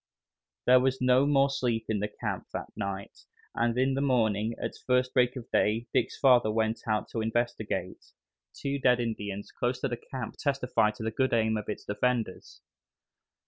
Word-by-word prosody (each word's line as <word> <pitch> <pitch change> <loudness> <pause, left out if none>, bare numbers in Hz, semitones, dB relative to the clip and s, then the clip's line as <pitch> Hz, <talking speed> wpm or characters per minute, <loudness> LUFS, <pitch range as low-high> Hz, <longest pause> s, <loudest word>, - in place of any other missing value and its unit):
There 125 +1 +7
was 130 +1 +1
no 125 +2 +4
more 140 -1 +4
sleep 120 -4 -1
in 110 -2 0
the 105 - -1
camp 105 - -5
that - - -5
night, 100 0 -5 0.3
and 120 0 0
in 130 +1 +2
the 135 - 0
morning, 115 -5 +1
at - - -2
the - - -16
first 125 0 +2
break 125 0 +3
of 125 -3 -8
day, 110 +3 +2
Dick's - - +1
father 125 -5 +5
went 110 +1 -1
out 110 -1 0
to 115 - -3
investigate. 120 0 -2 0.5
Two 140 0 -3
dead 125 -2 +4
Indians 105 -4 -4
close 125 +1 -2
to - - +1
the 120 - -3
camp 125 -1 -7
testified 125 -6 +1
to 110 - -7
the 110 - -1
good 130 +3 0
aim 110 -1 +2
of 105 -1 -4
its 105 - -5
defenders. 115 -1 -2
120 Hz, 185 wpm, -29 LUFS, 110-130 Hz, 0.5 s, There